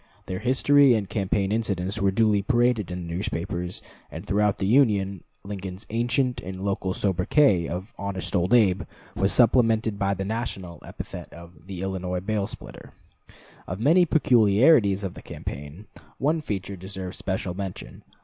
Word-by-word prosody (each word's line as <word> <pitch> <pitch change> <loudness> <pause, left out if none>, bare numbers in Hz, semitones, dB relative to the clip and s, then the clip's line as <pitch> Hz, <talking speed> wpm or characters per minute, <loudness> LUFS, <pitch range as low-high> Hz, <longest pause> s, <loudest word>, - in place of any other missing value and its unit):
Their 95 0 -4
history 135 +2 +4
and 105 -3 -2
campaign 100 0 -1
incidents 100 -2 -1
were 100 - +3
duly 105 0 +2
paraded 120 - +1
in 90 -1 -5
the 85 - -6
newspapers; 90 0 -4 0.3
and - - -8
throughout 105 +1 +1
the 95 - -2
Union 100 - +2 0.2
Lincoln's 95 -1 -7
ancient 120 +2 0
and 95 -2 -7
local 95 -2 -1
sobriquet 95 - +2
of 90 +4 -6
"Honest 100 0 -4
Old 90 0 +1
Abe" 100 -6 +4 0.3
was 100 0 +2
supplemented 115 -3 +3
by 100 -1 +1
the 95 +1 -4
national 100 -5 -5
epithet - - -8
of 85 0 -14
"The 95 -2 -6
Illinois 90 -1 -2
Bail 100 +1 -2
splitter." - - -10 0.7
Of 90 - -4
the 110 - -5
many 170 +5 +5
peculiarities 110 -5 +4
of 95 -2 -3
the - - -11
campaign, 75 +9 -8 0.3
one 155 +4 +1
feature 100 -7 -4
deserves 95 0 -7
special 95 -1 -2
mention. 95 0 -7
100 Hz, 155 wpm, -25 LUFS, 95-115 Hz, 0.7 s, many